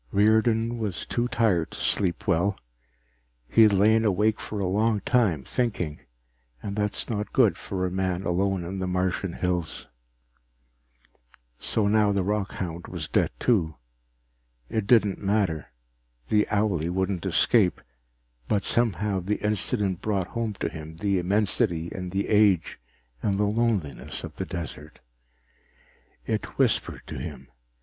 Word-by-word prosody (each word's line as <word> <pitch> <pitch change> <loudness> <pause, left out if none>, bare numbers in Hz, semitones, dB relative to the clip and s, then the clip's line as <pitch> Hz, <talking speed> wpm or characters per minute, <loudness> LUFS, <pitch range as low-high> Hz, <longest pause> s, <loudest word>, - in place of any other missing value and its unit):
_ - - -45
Riordan 110 +3 +3
was 105 -6 -3
too 120 0 -1
tired 110 -9 +1
to - - -8
sleep 90 -4 0
well. 95 +5 +1 0.9
He 115 - +4
had 110 -1 +7
lain 110 +3 +4
awake 105 +1 +2
for 105 - -5
a 100 - 0
long 105 +3 +1
time, 100 - +2
thinking, 95 - -2 0.6
and 100 - -4
that 105 -1 0
is - - -3
not 105 -2 -3
good 120 -6 +4
for 95 -2 -3
a 90 - -2
man 95 0 -1
alone 95 +1 0
in 95 +3 -5
the 95 - -2
Martian 90 0 -1
hills. 90 -3 -2 1.7
So 105 -2 0
now 105 0 +3
the 100 -2 +1
rockhound 95 -4 -3
was - - -5
dead - - +2
too. 85 -11 +2 0.9
It 110 -3 -2
didn't 105 -5 +4
matter, 100 -7 0 0.6
the 105 -1 +3
owlie 100 -6 +1
wouldn't 95 0 -1
escape. 105 -7 +3 0.7
But 100 -2 +1
somehow 105 -4 +1
the 95 +4 -1
incident 105 -2 0
brought 100 -4 -1
home 115 -2 -2
to - - 0
him 80 0 -9
the 100 +1 +1
immensity 95 -2 +1
and 90 -1 -5
the 95 +2 -1
age 105 - +3 0.4
and 100 -2 0
the 105 - +2
loneliness 105 - -1
of - - -8
the - - -3
desert. 80 -2 -7 1.3
It - - -3
whispered - - +1
to - - -6
him. - - -7
100 Hz, 145 wpm, -26 LUFS, 90-110 Hz, 1.7 s, had